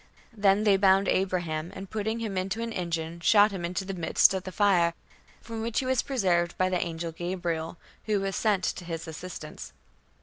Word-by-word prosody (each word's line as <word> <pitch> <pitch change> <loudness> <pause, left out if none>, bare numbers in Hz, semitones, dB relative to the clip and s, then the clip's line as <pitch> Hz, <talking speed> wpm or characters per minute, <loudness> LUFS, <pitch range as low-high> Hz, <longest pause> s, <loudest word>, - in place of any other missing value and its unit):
"Then 205 -1 +3
they 205 -2 +5
bound 195 0 +4
Abraham, 175 -4 -1
and 195 +1 -7
putting 220 +3 -2
him 215 -4 -3
into 195 +5 -2
an 230 -1 -4
engine, 170 -1 -3
shot 205 +4 +5
him 190 -3 -5
into 180 +2 -2
the 195 - -4
midst 175 +1 +4
of 190 -1 -3
the 185 - -5
fire, 180 -5 +3 0.5
from 225 -1 -6
which 230 0 -3
he 265 - +1
was 260 -1 +2
preserved 180 -10 0
by 185 0 +2
the 180 -1 0
angel 165 -1 -3
Gabriel, 175 -1 -3 0.3
who 210 -2 +2
was 195 0 -2
sent 205 -4 +1
to 180 - -2
his 165 -1 -5
assistance." 160 -1 -8
185 Hz, 195 wpm, -28 LUFS, 170-205 Hz, 0.5 s, they